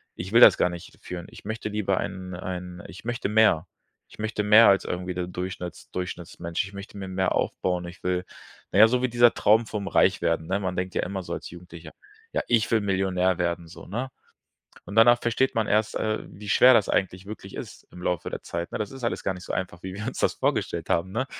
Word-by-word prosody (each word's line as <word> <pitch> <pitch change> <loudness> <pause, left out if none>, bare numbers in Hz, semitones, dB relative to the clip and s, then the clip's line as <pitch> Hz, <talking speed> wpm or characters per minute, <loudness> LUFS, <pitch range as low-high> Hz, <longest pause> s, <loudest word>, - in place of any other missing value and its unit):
ich 95 +3 -6
will 115 - +7
das - - +9
gar - - +2
nicht 85 -1 -10
führen. 90 -1 -7
Ich - - -14
möchte 110 +1 -4
lieber 100 -3 0
einen 95 -1 -5
einen 90 0 -6
ich 90 +6 -11
möchte 120 -2 -2
mehr. 105 -6 +4 0.4
Ich - - -16
möchte 105 -1 -2
mehr 105 +2 +8
als 100 -1 +3
irgendwie 90 +1 -3
der 90 0 -3
Durchschnitts 90 -1 -6
Durchschnittsmensch. 85 -2 -4
Ich 100 - -10
möchte 100 +1 -9
mir 95 -1 -6
mehr 95 0 0
aufbauen, 90 -1 -1
ich 90 - -11
will 90 0 0 0.5
na - - +2
ja, 110 - +10
so 125 +2 0
wie 130 - +2
dieser 120 0 +5
Traum 110 +2 +3
vom 100 -3 -4
Reichwerden, 85 -1 +2
ne? 95 +3 0
Man 95 -1 -2
denkt 90 0 -3
ja - - +1
immer 95 0 -4
so - - -5
als - - -6
Jugendlicher, 85 -2 -11 0.4
ja, - - +1
ich 115 -2 +2
will 115 - +4
Millionär 95 -2 +1
werden 85 -1 -1
so, 80 - -12
ne? 120 +7 -3 0.8
Und 100 - -7
danach 120 +2 +7
versteht 120 +3 +1
man 110 -1 +1
erst, 110 +1 +1
äh, 110 0 -1
wie 105 +2 -10
schwer 125 +5 +7
das 105 - +3
eigentlich 95 0 -1
wirklich 110 +2 -9
ist - - -9
im 90 - -11
Laufe 90 -3 -2
der - - -5
Zeit, 85 0 -5
ne? - - -3
Das 105 - -3
ist 135 -2 -8
alles 115 - -1
gar 95 - -1
nicht 90 - -10
so - - -5
einfach, 90 -2 -4
wie 95 - -6
wir 105 +3 -5
uns 125 - -4
das - - +1
vorgestellt - - -1
haben, 95 +3 +1
ne? 130 +5 -1
95 Hz, 235 wpm, -26 LUFS, 90-110 Hz, 0.8 s, ja